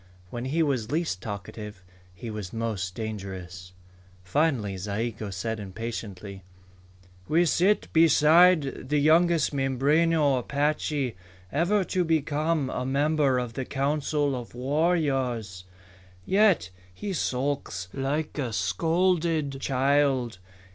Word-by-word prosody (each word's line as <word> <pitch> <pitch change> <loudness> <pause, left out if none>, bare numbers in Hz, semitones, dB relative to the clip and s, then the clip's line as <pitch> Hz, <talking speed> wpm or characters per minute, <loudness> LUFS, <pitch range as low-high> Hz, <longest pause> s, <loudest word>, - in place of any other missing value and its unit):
When 120 +1 -5
he 160 +5 +1
was 130 -6 -1
least 155 - -1
talkative, 105 -1 -7 0.3
he 90 +6 -8
was 105 -4 -6
most 105 -5 -3
dangerous. 95 -5 -6 0.5
Finally 115 - 0
Zayigo 105 +2 -3
said 110 +4 -4
impatiently: 100 -1 -6 0.9
"We 170 +3 +3
sit 190 +5 +2
beside 160 -2 +4
the 150 - +2
youngest 160 +1 +3
Mimbreno 140 +2 +2
Apache 145 -1 -1 0.4
ever 180 +7 +2
to 180 0 0
become 155 -2 0
a 125 - -3
member 140 0 +2
of 120 -2 -3
the 130 - -3
Council 145 +1 0
of 120 -1 -8
Warriors. 130 - 0 0.6
Yet 195 - +3 0.2
he 195 - -5
sulks 130 - -2
like 145 +3 -2
a 125 -5 -2
scolded 165 -3 0
child. 135 -5 +1
135 Hz, 105 wpm, -26 LUFS, 110-155 Hz, 0.9 s, beside